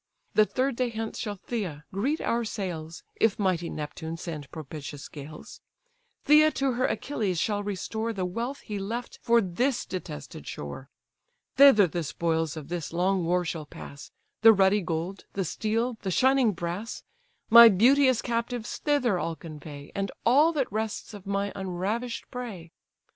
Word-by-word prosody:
The 215 Hz, -1 st, +5 dB
third 260 Hz, -1 st, -1 dB
day 250 Hz, -1 st, +1 dB
hence 225 Hz, -1 st, -5 dB
shall 210 Hz, -4 st, -3 dB
Pythia 180 Hz, -9 st, -5 dB
greet 265 Hz, +11 st, 0 dB
our 235 Hz, 0 st, 0 dB
sails, 175 Hz, -7 st, -5 dB
If 225 Hz, -3 st, +2 dB
mighty 185 Hz, -4 st, 0 dB
Neptune 160 Hz, +2 st, -5 dB
send 155 Hz, -4 st, -6 dB
propitious 150 Hz, -2 st, -8 dB
gales; 150 Hz, +1 st, -10 dB, 0.6 s
Pythia 305 Hz, +1 st, +7 dB
to 270 Hz, -1 st, +1 dB
her 255 Hz, +1 st, +1 dB
Achilles 210 Hz, -10 st, -2 dB
shall 205 Hz, +2 st, 0 dB
restore 215 Hz, +3 st, -3 dB
The 190 Hz, -4 st, -2 dB
wealth 235 Hz, +9 st, -4 dB
he 210 Hz, -3 st, -5 dB
left 230 Hz, +5 st, -5 dB
for 235 Hz, 0 st, +4 dB
this 235 Hz, +8 st, 0 dB
detested 175 Hz, -, -7 dB
shore: 75 Hz, -, -7 dB, 0.7 s
Thither 270 Hz, -8 st, +8 dB
the 175 Hz, 0 st, -3 dB
spoils 160 Hz, 0 st, -1 dB
of 150 Hz, -3 st, -7 dB
this 170 Hz, -2 st, -4 dB
long 180 Hz, +2 st, +1 dB
war 180 Hz, +1 st, +1 dB
shall 160 Hz, -3 st, -4 dB
pass, 140 Hz, 0 st, -10 dB, 0.3 s
The 225 Hz, 0 st, +9 dB
ruddy 195 Hz, +1 st, +4 dB
gold, 170 Hz, +3 st, -4 dB
the 195 Hz, -2 st, -1 dB
steel, 225 Hz, +6 st, -1 dB
and 190 Hz, -, -1 dB
shining 260 Hz, +1 st, +4 dB
brass: 175 Hz, +6 st, -5 dB, 0.5 s
My 235 Hz, 0 st, +11 dB
beauteous 255 Hz, +5 st, +4 dB
captives 235 Hz, -1 st, -2 dB
thither 255 Hz, -, +1 dB
I'll 165 Hz, -1 st, -2 dB
convey, 150 Hz, -2 st, -10 dB
And 195 Hz, 0 st, -2 dB
all 290 Hz, +7 st, +5 dB
that 275 Hz, -8 st, -1 dB
rests 220 Hz, +1 st, -3 dB
of 200 Hz, -1 st, -10 dB
my 200 Hz, 0 st, -1 dB
unravish'd 195 Hz, +6 st, -3 dB
prey. 210 Hz, -10 st, -7 dB
200 Hz, 155 wpm, -27 LUFS, 170-235 Hz, 0.7 s, My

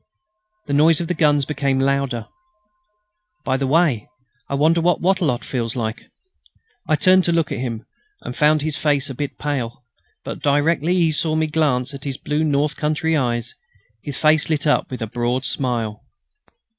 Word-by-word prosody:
The 145 Hz, -, -3 dB
noise 155 Hz, +2 st, +5 dB
of 170 Hz, -, -3 dB
the -, -, +1 dB
guns 145 Hz, -4 st, +2 dB
became 140 Hz, -2 st, -1 dB
louder. 135 Hz, -4 st, 0 dB, 1.2 s
"By 130 Hz, -, 0 dB
the 135 Hz, 0 st, -1 dB
way!... 145 Hz, -7 st, +2 dB, 0.4 s
I 140 Hz, -, -1 dB
wonder 160 Hz, +4 st, +3 dB
what 175 Hz, +1 st, +2 dB
Wattrelot 175 Hz, -9 st, +1 dB
feels 120 Hz, -2 st, -3 dB
like!" 110 Hz, -2 st, -4 dB, 0.8 s
I 155 Hz, -, +3 dB
turned 185 Hz, +4 st, +4 dB
to 170 Hz, -, +2 dB
look 165 Hz, -2 st, +1 dB
at -, -, -3 dB
him, 120 Hz, -3 st, -4 dB, 0.4 s
and 125 Hz, -, -7 dB
found 150 Hz, 0 st, +3 dB
his 155 Hz, -1 st, -1 dB
face 145 Hz, -2 st, 0 dB
a -, -, -5 dB
bit 145 Hz, +2 st, -5 dB
pale; 130 Hz, -5 st, -3 dB, 0.4 s
but -, -, -6 dB
directly 150 Hz, +4 st, +2 dB
he 170 Hz, -3 st, +3 dB
saw 155 Hz, +1 st, 0 dB
me 160 Hz, 0 st, +2 dB
glance 145 Hz, -4 st, 0 dB
at 140 Hz, -, -9 dB
his 135 Hz, -2 st, -4 dB
blue 150 Hz, +1 st, -1 dB
north 150 Hz, 0 st, +1 dB
country 160 Hz, +2 st, 0 dB
eyes, 120 Hz, -4 st, -1 dB, 0.5 s
his 140 Hz, +2 st, -4 dB
face 155 Hz, 0 st, +3 dB
lit 155 Hz, -2 st, 0 dB
up 150 Hz, -, +2 dB
with 125 Hz, -2 st, -5 dB
a -, -, -3 dB
broad 120 Hz, +3 st, -2 dB
smile. 120 Hz, -4 st, -2 dB
145 Hz, 175 wpm, -21 LUFS, 130-155 Hz, 1.2 s, noise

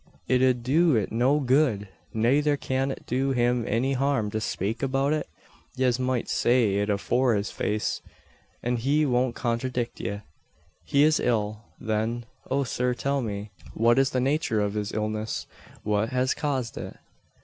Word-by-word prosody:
It 130 Hz, -1 st, +3 dB
ud 125 Hz, -2 st, +3 dB
do 155 Hz, +4 st, +3 dB
it 105 Hz, -3 st, 0 dB
no 125 Hz, +6 st, +3 dB
good; 130 Hz, -6 st, +2 dB, 0.2 s
nayther 140 Hz, +6 st, +2 dB
cyan 135 Hz, 0 st, -1 dB
it 135 Hz, -, -6 dB
do 135 Hz, +2 st, 0 dB
him 120 Hz, -1 st, +2 dB
any 125 Hz, +5 st, +1 dB
harm 135 Hz, -5 st, 0 dB
to 110 Hz, 0 st, -2 dB
spake 105 Hz, +1 st, -2 dB
about 135 Hz, +2 st, +1 dB
it? 155 Hz, -, -2 dB, 0.5 s
Yez 130 Hz, -1 st, +1 dB
moight 130 Hz, -1 st, 0 dB
say 120 Hz, -5 st, +2 dB
it 105 Hz, +1 st, 0 dB
afore 120 Hz, +4 st, +2 dB
his 100 Hz, 0 st, -2 dB
face, 105 Hz, 0 st, -1 dB, 0.6 s
an 120 Hz, 0 st, 0 dB
he 145 Hz, +6 st, +2 dB
won't 125 Hz, -2 st, +1 dB
conthradict 120 Hz, 0 st, -2 dB
ye." 100 Hz, 0 st, -4 dB, 0.6 s
"He 140 Hz, +1 st, +3 dB
is 155 Hz, 0 st, +4 dB
ill, 110 Hz, -2 st, -1 dB
then. 110 Hz, +2 st, -1 dB, 0.2 s
O, 140 Hz, +1 st, +1 dB
sir, 125 Hz, -1 st, -1 dB
tell 140 Hz, +4 st, 0 dB
me, 105 Hz, -2 st, -5 dB, 0.2 s
what 120 Hz, +3 st, +4 dB
is 135 Hz, -, +3 dB
the 130 Hz, -, -1 dB
nature 135 Hz, -3 st, +1 dB
of 105 Hz, -1 st, 0 dB
his 105 Hz, -1 st, -2 dB
illness 110 Hz, 0 st, -2 dB, 0.4 s
what 105 Hz, +1 st, +1 dB
has 130 Hz, 0 st, +1 dB
caused 130 Hz, -6 st, -2 dB
it?" -, -, -7 dB
125 Hz, 165 wpm, -26 LUFS, 110-135 Hz, 0.6 s, is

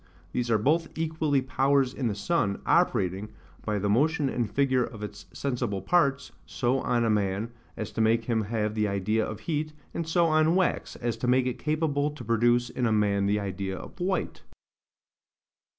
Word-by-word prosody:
These 120 Hz, -1 st, -2 dB
are 110 Hz, -, +4 dB
both 155 Hz, +9 st, +2 dB
equally 155 Hz, -4 st, 0 dB
powers 135 Hz, 0 st, +2 dB
in 130 Hz, -, -2 dB
the 105 Hz, -, -1 dB
sun, 100 Hz, -4 st, 0 dB
operating, 95 Hz, +3 st, +1 dB, 0.3 s
by 105 Hz, -1 st, -1 dB
the 100 Hz, +1 st, -1 dB
motion 145 Hz, +6 st, +2 dB
and 120 Hz, -4 st, -1 dB
figure 130 Hz, 0 st, +2 dB
of 110 Hz, -3 st, -7 dB
its 100 Hz, -2 st, -8 dB
sensible 120 Hz, -7 st, -2 dB
parts, 140 Hz, -, +1 dB, 0.2 s
so 130 Hz, +1 st, 0 dB
on 120 Hz, -2 st, +1 dB
a -, -, +2 dB
man, 105 Hz, +2 st, 0 dB, 0.3 s
as 110 Hz, -, -4 dB
to 115 Hz, -, -2 dB
make 115 Hz, +1 st, +3 dB
him 110 Hz, -3 st, 0 dB
have 105 Hz, -1 st, -1 dB
the 105 Hz, -1 st, +1 dB
idea 105 Hz, +3 st, 0 dB
of 110 Hz, -, -5 dB
heat; 155 Hz, -1 st, -2 dB, 0.2 s
and 165 Hz, -, -3 dB
so 170 Hz, +1 st, +3 dB
on 155 Hz, +1 st, +3 dB
wax, 185 Hz, -1 st, 0 dB
as 120 Hz, -1 st, -3 dB
to 125 Hz, -, -3 dB
make 125 Hz, +1 st, +3 dB
it 125 Hz, -1 st, -2 dB
capable 150 Hz, -1 st, 0 dB
to 150 Hz, 0 st, -9 dB
produce 120 Hz, +2 st, +3 dB
in 125 Hz, -2 st, 0 dB
a -, -, +1 dB
man 100 Hz, -2 st, +2 dB
the 105 Hz, +1 st, +2 dB
idea 95 Hz, -1 st, -4 dB
of -, -, -11 dB
white. 185 Hz, +2 st, -2 dB
120 Hz, 185 wpm, -27 LUFS, 105-145 Hz, 0.3 s, are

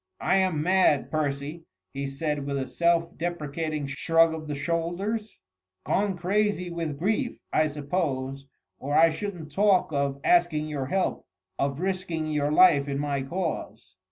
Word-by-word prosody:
"I 195 Hz, -, +2 dB
am 185 Hz, -6 st, +1 dB
mad, 180 Hz, -5 st, +3 dB
Percy," 150 Hz, +1 st, -2 dB, 0.3 s
he 140 Hz, 0 st, -3 dB
said 145 Hz, +1 st, -3 dB
with 140 Hz, -1 st, -1 dB
a 130 Hz, -, -2 dB
self 170 Hz, 0 st, +1 dB
deprecating 155 Hz, -2 st, -3 dB
shrug 165 Hz, +4 st, +3 dB
of 155 Hz, -1 st, -6 dB
the 150 Hz, -, -3 dB
shoulders, 175 Hz, +8 st, -2 dB, 0.5 s
"gone 200 Hz, -2 st, 0 dB
crazy 190 Hz, 0 st, 0 dB
with 165 Hz, -4 st, -3 dB
grief, 215 Hz, -, -1 dB, 0.2 s
I 155 Hz, 0 st, +3 dB
suppose, 140 Hz, -3 st, -3 dB, 0.3 s
or 145 Hz, +2 st, -2 dB
I 165 Hz, 0 st, +6 dB
shouldn't 170 Hz, -3 st, -6 dB
talk 195 Hz, -1 st, +3 dB
of 140 Hz, -1 st, 0 dB
asking 170 Hz, -3 st, +3 dB
your 140 Hz, -3 st, -3 dB
help, 190 Hz, +5 st, -1 dB, 0.3 s
of 140 Hz, +1 st, -1 dB
risking 180 Hz, -4 st, -2 dB
your 145 Hz, -1 st, 0 dB
life 150 Hz, -4 st, +6 dB
in 140 Hz, -1 st, -2 dB
my 140 Hz, -1 st, -1 dB
cause." 165 Hz, +5 st, -4 dB
160 Hz, 150 wpm, -26 LUFS, 145-180 Hz, 0.5 s, I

